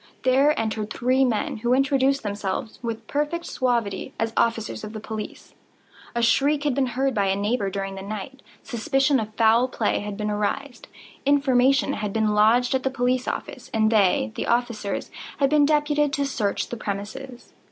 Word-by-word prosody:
There 270 +3 +3
entered 220 -1 -2
three 255 +2 +2
men, 230 -5 0
who 240 +3 +1
introduced 275 0 +2
themselves, 205 +1 -4
with 230 -2 -4
perfect 300 +7 -2
suavity, 235 - -1
as 225 0 -1
officers 225 -2 0
of 215 +1 -7
the 215 - -5
police. 215 0 -7 0.6
A 235 - 0
shriek 285 +5 +3
had 290 -3 +1
been 265 0 +1
heard 270 0 +1
by 200 -3 +1
a 190 - +2
neighbour 205 +1 0
during 195 0 -4
the 195 - -7
night; 215 +6 -7 0.2
suspicion 270 +2 +1
of 215 0 -5
foul 230 +2 +4
play 230 -4 0
had 205 -1 -5
been 210 0 -2
aroused; 235 +5 -3 0.4
information 275 -1 +3
had 210 -2 -3
been 220 -1 +1
lodged 230 +4 +4
at 265 - +1
the 265 - 0
police 255 -1 0
office, 255 - -5
and 220 0 +3
they 190 - +3
(the - - -4
officers) 235 -4 -1 0.3
had 275 -1 +2
been 295 -1 +5
deputed 295 -1 +2
to 285 -2 0
search 215 -7 -1
the 240 - -5
premises. 235 +6 -6
240 Hz, 175 wpm, -24 LUFS, 215-270 Hz, 0.6 s, been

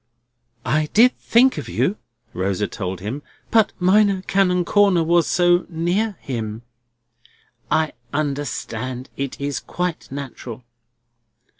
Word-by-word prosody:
"I 155 +1 +1
did 245 +4 +6
think 255 +3 +4
of - - -7
you," 205 - 0 0.4
Rosa 95 +2 -1
told 95 -3 -5
him; 115 +9 -4 0.3
"but 220 -2 +4
Minor 195 +1 +3
Canon 180 -2 +2
Corner 195 -3 +4
was 170 +1 +3
so 175 0 +3
near 180 +5 -1
him—" 115 -3 -4 1.1
"I 160 -1 +1 0.2
understand. 135 -4 -3
It 140 -1 -4
was 140 0 -2
quite 180 -5 -4
natural." 130 -3 -7
160 Hz, 115 wpm, -21 LUFS, 130-185 Hz, 1.1 s, did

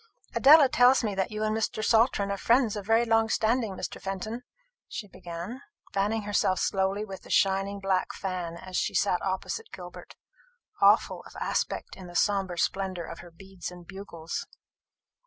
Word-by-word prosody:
"Adela 295 0 +8
tells 250 0 +5
me 210 -2 -1
that 190 0 -1
you 215 0 -3
and 215 0 0
Mr. 220 0 -1
Saltram 220 -3 +3
are 200 - -2
friends 235 0 +3
of 205 -1 -6
very 225 +1 +4
long 225 -1 +3
standing, 220 -2 +1
Mr. - - -6
Fenton," 195 +5 -4 0.5
she 205 - -6
began, 180 +7 -7 0.3
fanning 210 +2 0
herself 200 -2 +1
slowly 195 +1 0
with 195 -2 -9
a - - -15
shining 195 +1 +2
black 195 -1 0
fan 180 -3 -4
as 185 +1 -9
she - - -1
sat 180 -3 +2
opposite 195 - -3
Gilbert, - - -10 0.7
awful - - +4
of - - -16
aspect - - -2
in 185 -2 -10
the 175 - -12
sombre 195 -2 +1
splendour 185 -1 -1
of - - -8
her 175 - -11
beads 190 +1 -9
and 180 -1 -12
bugles. 175 -4 -6
200 Hz, 170 wpm, -28 LUFS, 185-220 Hz, 0.7 s, Adela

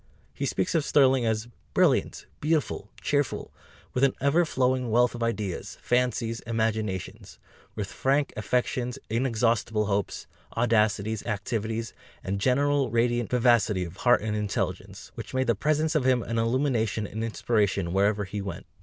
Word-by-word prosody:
He - - -2
speaks 95 - -1
of 160 - +2
Sterling 130 -4 +4
as 110 +1 -1 0.3
"brilliant, - - +2
beautiful, 150 -9 -1
cheerful 145 -1 -1 0.4
with 125 - 0
an 135 - +4
ever 150 +6 +3
flowing 130 -4 0
wealth 120 +2 +3
of 120 - -7
ideas, 105 -5 -3
fancies, 120 -2 0
imaginations... 110 -4 -3 0.4
with 105 -3 -3
frank 140 +1 +1
affections, 125 +2 -1
inexhaustible 115 -2 +1
hopes, 100 -1 -2 0.3
audacities, 110 -2 +1
activities, 110 +1 -2 0.3
and 100 +1 -3
general 140 +2 +2
radiant 120 0 +1
vivacity 115 -6 +3
of 85 +1 -8
heart 120 +1 +3
and 110 -1 -1
intelligence, 105 -2 -3
which - - -8
made 130 0 +2
the 115 - +3
presence 155 +7 +1
of 155 -5 +2
him 125 -2 +3
an 115 0 -2
illumination 115 -3 0
and 110 +3 -5
inspiration 105 -5 0
wherever 100 +2 +2
he 100 +1 -5
went." 95 -3 -6
115 Hz, 145 wpm, -27 LUFS, 105-130 Hz, 0.4 s, Sterling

